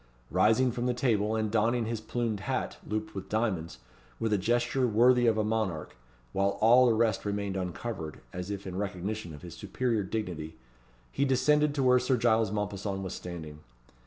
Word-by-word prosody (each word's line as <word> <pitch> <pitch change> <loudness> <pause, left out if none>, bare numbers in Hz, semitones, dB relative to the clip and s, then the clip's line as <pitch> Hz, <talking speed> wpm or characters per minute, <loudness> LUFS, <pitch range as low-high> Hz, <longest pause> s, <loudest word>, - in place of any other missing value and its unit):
Rising 125 +4 +4
from 120 +1 -2
the 125 - 0
table, 110 -4 +1
and 110 -1 -1
donning 115 +2 +2
his 115 -1 -3
plumed 115 -2 -2
hat, 95 - -3
looped 110 0 -3
with 95 -1 -7
diamonds, 95 - -1 0.4
with 110 -1 0
a - - +4
gesture 120 +5 +1
worthy 120 +2 +4
of 110 -1 +3
a 110 - +2
monarch, 105 -7 -2 0.4
while 100 +1 +1
all 120 +3 +6
the 115 - +3
rest 110 -2 +1
remained 100 -1 -2
uncovered, 90 -2 -4
as 90 +1 -5
if 100 -1 -5
in 95 -1 -5
recognition 100 -1 -3
of 75 +1 -11
his 85 - -8
superior 110 +3 -1
dignity, 90 -6 -4 0.5
he 140 - 0
descended 150 +2 +3
to 140 - +1
where 125 0 +5
Sir 125 +1 +1
Giles 115 -3 +2
Mompesson 100 -1 -3
was 95 - -4
standing. 80 -4 -7
110 Hz, 180 wpm, -29 LUFS, 95-120 Hz, 0.5 s, all